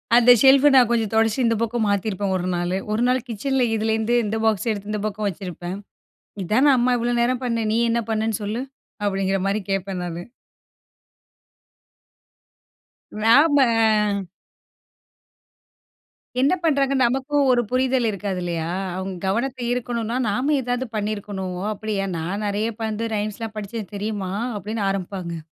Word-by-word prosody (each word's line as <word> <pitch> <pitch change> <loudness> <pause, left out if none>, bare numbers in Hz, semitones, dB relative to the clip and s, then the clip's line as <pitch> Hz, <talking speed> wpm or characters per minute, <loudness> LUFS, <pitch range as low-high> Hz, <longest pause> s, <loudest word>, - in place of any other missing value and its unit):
அந்த 245 +1 +7
ஷெல்ஃபு 270 +1 +7
நான் 250 -3 +6
கொஞ்சம் 225 -3 0
தொடச்சி 225 +2 +2
இந்த 230 0 +2
பக்கம் 230 0 0
மாத்தியிருப்பேன் 200 -1 -1
ஒரு 180 -1 -2
நாளு. 175 +1 -1
ஒரு 215 +2 0
நாள் 255 +1 +2
கிச்சன்ல 255 +4 -1
இதிலேருந்து 220 +1 0
இந்த 215 +2 -2
பாக்ஸ் 220 0 +1
எடுத்து 205 0 -5
இந்த 210 - -2
பக்கம் 210 0 -2
வச்சிருப்பேன். 180 -1 -6 0.7
இதானே 255 +10 +4
அம்மா 250 +1 +2
இவ்ளோ 240 +1 0
நேரம் 250 +2 +1
பண்ண, 230 -2 -1
"நீ 225 - +2
என்ன 235 +1 +1
பண்ணன்னு 220 -1 -1
சொல்லு 215 +4 -3 0.4
அப்டிங்கிற 195 -1 0
மாரி 200 +2 0
கேட்பேன்" 195 -1 -2
நானு. 175 0 -5 2.9
நாம 225 - +3 2.1
என்ன 275 +6 +4
பண்றாங்க 275 -4 +2
நமக்கும் 270 +4 +1
ஒரு 245 -1 +3
புரிதல் 255 -1 +1
இருக்காது 200 -2 -3
இல்லையா? 170 -2 -2 0.3
அவங்க 190 0 -4
கவனத்த 245 +7 -1
ஈர்க்கணுன்னா 240 -1 -2
நாம 255 +9 0
ஏதாவது 245 +1 -2
பண்ணிருக்கணும். 205 -3 -3 0.2
அப்படியா, 205 -2 -3
நான் 180 +6 -3
நெறையா 210 +3 -1
அப் 225 +1 -7
வந்து 220 +1 -2
ரைம்ஸ் 210 +1 -3
லாம் 220 -1 -6
படிச்சேன் 210 0 -6
தெரியுமா? 200 -2 -3 0.2
அப்படின்னு 210 +2 -4
ஆரம்பிப்பாங்க. 185 -3 -4
215 Hz, 135 wpm, -22 LUFS, 200-240 Hz, 2.9 s, அந்த